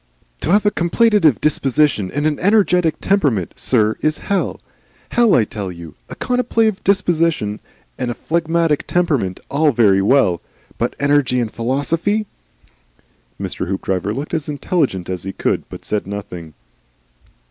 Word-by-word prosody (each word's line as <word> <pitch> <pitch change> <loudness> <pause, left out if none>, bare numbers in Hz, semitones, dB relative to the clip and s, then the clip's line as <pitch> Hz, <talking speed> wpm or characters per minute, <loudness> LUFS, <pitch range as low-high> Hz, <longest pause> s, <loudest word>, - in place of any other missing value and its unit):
"To - - -2
have 205 +4 +3
a 205 - +4
contemplative 175 - +3
disposition 140 -7 +1
and 145 +7 -2
an 155 -2 0
energetic 180 -4 +3
temperament, 145 - +1
sir, 110 -3 +1
is 155 0 +1
hell. 200 -2 -2 0.5
Hell, 235 -3 +4
I 115 - +4
tell 105 -3 -5
you. 85 -3 -10 0.2
A - - -7
contemplative 225 -4 0
disposition 165 - +1 0.4
and 125 - -2
a 120 - -3
phlegmatic 165 0 0
temperament, 145 - 0
all 150 +1 +3
very 105 -6 +4
well. 100 -5 +3 0.4
But - - -1
energy 140 -3 +2
and 115 -3 -2
philosophy 160 - 0 0.6
!" - - -39
Mr. - - -4
Hoopdriver 95 +1 -2
looked 140 +9 -5
as 155 -3 -2
intelligent 140 - -1
as 90 -1 -4
he 95 +1 -6
could, - - -2
but - - -10
said 105 -3 -2
nothing. 90 -6 -7
145 Hz, 145 wpm, -19 LUFS, 105-170 Hz, 0.6 s, a